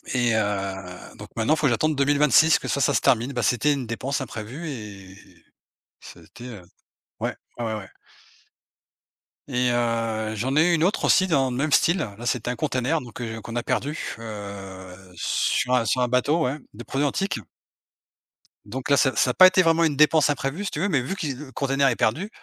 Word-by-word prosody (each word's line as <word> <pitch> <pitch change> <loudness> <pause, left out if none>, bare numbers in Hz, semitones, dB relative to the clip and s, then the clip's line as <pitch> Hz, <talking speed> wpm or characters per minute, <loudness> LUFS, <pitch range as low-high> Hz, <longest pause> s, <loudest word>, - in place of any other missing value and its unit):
et 120 -2 +2
heu, 95 -3 -3
donc - - -10
maintenant, 115 +7 +1
il - - +1
faut 150 -2 +2
que - - +3
j'attende 150 +7 +1
2026, 145 +2 +4
que - - -7
ça, 140 - -1
ça - - +2
se - - +2
termine. 125 +3 +2
Bah, 120 -2 -2
c'était 145 +4 +2
une 135 -3 -4
dépense 130 +5 -3
imprévue 125 +7 -7
et 100 -7 -9 0.8
ça - - -13
a - - -17
été, 120 - -13
heu, 110 -6 -9 0.6
ouais, - - -2 0.2
ouais 120 - -2
ouais 110 -1 -2
ouais. 95 -3 -8 1.6
Et 125 -2 +1
heu, 115 -2 -1
j'en 130 +6 -2
ai 160 +3 +4
eu - - +3
une 160 - 0
autre 190 +5 +1
aussi, 185 - +4
dans 140 -7 +1
le 125 - -4
même 150 +3 -1
style. 170 +5 +4
Là, 115 - -5
c'était 120 +1 -1
un 125 - -4
container 140 +3 -1
donc 120 0 -10
heu, 115 -2 -5
qu'on 115 +2 -8
a 120 - -1
perdu, 150 +3 -3
heu, 100 -4 -8 0.2
sur 125 +8 0
un 125 - +3
sur 125 +4 +1
un 125 - +2
bateau 130 +7 +1
ouais, 135 +4 -2 0.2
des 120 - -8
produits 140 +3 -1
antiques 195 - -2 1.3
donc 130 +2 -6
là, 140 - +5
ça 130 -4 +2
ça 125 +3 +2
a - - -5
pas 185 +6 +9
été 185 0 +4
vraiment 165 0 +3
une 155 -3 +1
dépense 150 +1 +4
imprévue, 145 +6 -2
si - - -3
tu - - -4
veux, 205 - +1
mais 145 -6 +1
vu 130 +10 -4
qui 150 -8 -3
le 135 +1 -10
container 135 0 +1
est 125 - +2
perdu 160 - 0
125 Hz, 215 wpm, -24 LUFS, 115-150 Hz, 1.6 s, pas